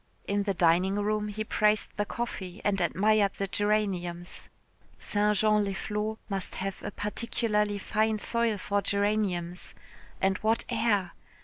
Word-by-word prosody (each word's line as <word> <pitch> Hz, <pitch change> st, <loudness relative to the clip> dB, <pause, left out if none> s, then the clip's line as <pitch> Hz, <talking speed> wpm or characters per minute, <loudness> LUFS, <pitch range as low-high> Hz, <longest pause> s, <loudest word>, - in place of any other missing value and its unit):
In 200 Hz, 0 st, 0 dB
the 200 Hz, -1 st, -1 dB
dining 175 Hz, +3 st, +3 dB
room 210 Hz, +1 st, 0 dB
he 210 Hz, +1 st, -3 dB
praised 215 Hz, 0 st, +2 dB
the 210 Hz, 0 st, -1 dB
coffee, 195 Hz, -5 st, -4 dB
and 195 Hz, -2 st, +2 dB
admired 200 Hz, +4 st, +3 dB
the 200 Hz, -, -1 dB
geraniums. 190 Hz, -4 st, -1 dB, 0.5 s
St. 210 Hz, 0 st, +1 dB
Jean 215 Hz, 0 st, +4 dB
les 200 Hz, -1 st, -2 dB
Flots 210 Hz, +2 st, -3 dB
must 195 Hz, -2 st, -4 dB
have 195 Hz, 0 st, -4 dB
a -, -, -4 dB
particularly 210 Hz, 0 st, -1 dB
fine 215 Hz, +2 st, +1 dB
soil 235 Hz, 0 st, +1 dB
for 200 Hz, +1 st, 0 dB
geraniums, 200 Hz, -4 st, -1 dB, 0.4 s
and 190 Hz, 0 st, +1 dB
what 220 Hz, +1 st, +1 dB
air! 215 Hz, -6 st, +1 dB
205 Hz, 140 wpm, -29 LUFS, 195-215 Hz, 0.5 s, Jean